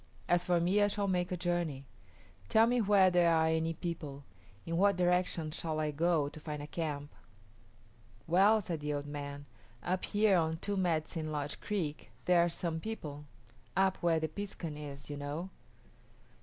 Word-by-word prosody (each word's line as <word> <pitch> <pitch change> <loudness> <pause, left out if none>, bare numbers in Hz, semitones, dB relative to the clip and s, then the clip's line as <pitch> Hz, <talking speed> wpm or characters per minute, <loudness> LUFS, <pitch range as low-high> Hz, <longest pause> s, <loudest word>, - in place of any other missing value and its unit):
As 175 0 +3
for 175 -1 +2
me, 185 +5 +3
I 205 - +5
shall 205 0 -1
make 180 -1 0
a 180 - -1
journey. 170 -6 -1 0.6
Tell 220 +1 +6
me 245 +1 +2
where 195 -3 +5
there 175 -1 +4
are 160 -1 +4
any 160 0 +1
people. 155 -5 -5 0.4
In 165 - -2
what 200 +3 +4
direction 180 -3 +1
shall 155 -1 -3
I 155 -1 0
go 160 0 +2
to 155 - -9
find 150 -1 -5
a - - -5
camp?" 150 -2 -4 1.1
"Well," 200 +6 +5
said 170 -5 -4
the 150 0 -2
old 145 0 -3
man, 145 -1 -6 0.4
"up 185 +1 -1
here 205 -2 +3
on 160 -1 +1
Two 200 +4 -2
Medicine 160 -3 -1
Lodge 145 -1 -3
Creek 170 -8 -3 0.2
there 175 -1 +5
are 175 - +1
some 165 -1 -3
people 150 -8 -6 0.5
up 190 -1 +3
where 165 -2 +2
the 160 - -1
piskun 165 -2 -5
is, 145 -1 -8
you 145 - -4
know." 150 +6 -4
165 Hz, 175 wpm, -33 LUFS, 150-185 Hz, 1.1 s, Tell